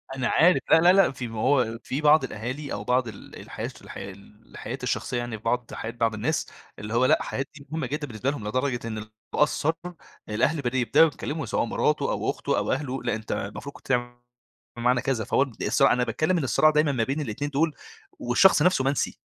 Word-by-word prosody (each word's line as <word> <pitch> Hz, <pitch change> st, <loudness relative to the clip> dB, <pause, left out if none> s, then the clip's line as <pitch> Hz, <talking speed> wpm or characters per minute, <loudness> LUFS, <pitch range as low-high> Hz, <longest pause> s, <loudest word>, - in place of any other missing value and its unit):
أنا 130 Hz, -2 st, -1 dB
عارف، 180 Hz, +3 st, +4 dB
لا، 160 Hz, -, +7 dB
لا، 175 Hz, +2 st, +6 dB
لا، 195 Hz, -5 st, +5 dB
في 130 Hz, -2 st, -6 dB
ما 115 Hz, -1 st, -6 dB
هو 125 Hz, -3 st, +2 dB
في 135 Hz, +4 st, -3 dB
بعض 150 Hz, -1 st, +5 dB
الأهالي 130 Hz, +5 st, -5 dB
أو 100 Hz, -, -4 dB
بعض 125 Hz, +2 st, +1 dB
ال 105 Hz, -3 st, -10 dB
الحياة -, -, -6 dB
الش -, -, -9 dB
الحياة 100 Hz, -, -8 dB, 0.3 s
الحياة -, -, -7 dB
الشخصية 125 Hz, -, -1 dB
يعني 120 Hz, -2 st, -3 dB
في 105 Hz, -, -20 dB
بعض 120 Hz, +1 st, -1 dB
حياة 115 Hz, -, -5 dB
بعض 115 Hz, -1 st, 0 dB
الناس، 125 Hz, +9 st, -1 dB, 0.3 s
اللي 105 Hz, +2 st, -6 dB
هو 120 Hz, +2 st, +3 dB
لأ، -, -, +3 dB
حاجات 135 Hz, 0 st, -3 dB
دي 140 Hz, -1 st, -13 dB
مهمة 160 Hz, -5 st, -2 dB
جدًا 145 Hz, +2 st, -3 dB
بالنسبة 120 Hz, +2 st, -2 dB
لهم 110 Hz, -8 st, -6 dB
لدرجة 125 Hz, +1 st, -1 dB
إنه 110 Hz, -1 st, -4 dB
لو 110 Hz, -, -12 dB, 0.3 s
قَصَّر 150 Hz, +1 st, +2 dB, 0.6 s
الأهل 140 Hz, +8 st, +1 dB
بدأ 125 Hz, 0 st, -1 dB
يبدؤوا 125 Hz, +6 st, +5 dB
يتكلموا، 150 Hz, 0 st, -4 dB
سواء -, -, 0 dB
مراته -, -, 0 dB
أو -, -, -1 dB
أخته -, -, -1 dB
أو -, -, 0 dB
أهله، 135 Hz, -1 st, -2 dB
لأ -, -, 0 dB
أنت 110 Hz, 0 st, -7 dB
المفروض 105 Hz, +8 st, -5 dB
كنت -, -, -15 dB
تع 120 Hz, -1 st, 0 dB, 0.6 s
بمعنى 120 Hz, +1 st, +2 dB
كذا، 130 Hz, -4 st, -1 dB
فهو 135 Hz, -, +2 dB
بد 125 Hz, -, -9 dB
الصراع 135 Hz, +6 st, +4 dB
أنا 125 Hz, -, +1 dB
باتكلم 155 Hz, +8 st, 0 dB
إن 165 Hz, -, -1 dB
الصراع 155 Hz, +4 st, +4 dB
دايمًا 150 Hz, -1 st, +2 dB
ما 125 Hz, -4 st, 0 dB
بين 135 Hz, +6 st, -2 dB
الاتنين 145 Hz, +2 st, -3 dB
دول، 155 Hz, +2 st, +1 dB, 0.5 s
والشخص 135 Hz, +8 st, +4 dB
نفسه 180 Hz, -4 st, +3 dB
منسي، 135 Hz, +1 st, -1 dB
130 Hz, 215 wpm, -26 LUFS, 115-145 Hz, 0.6 s, لا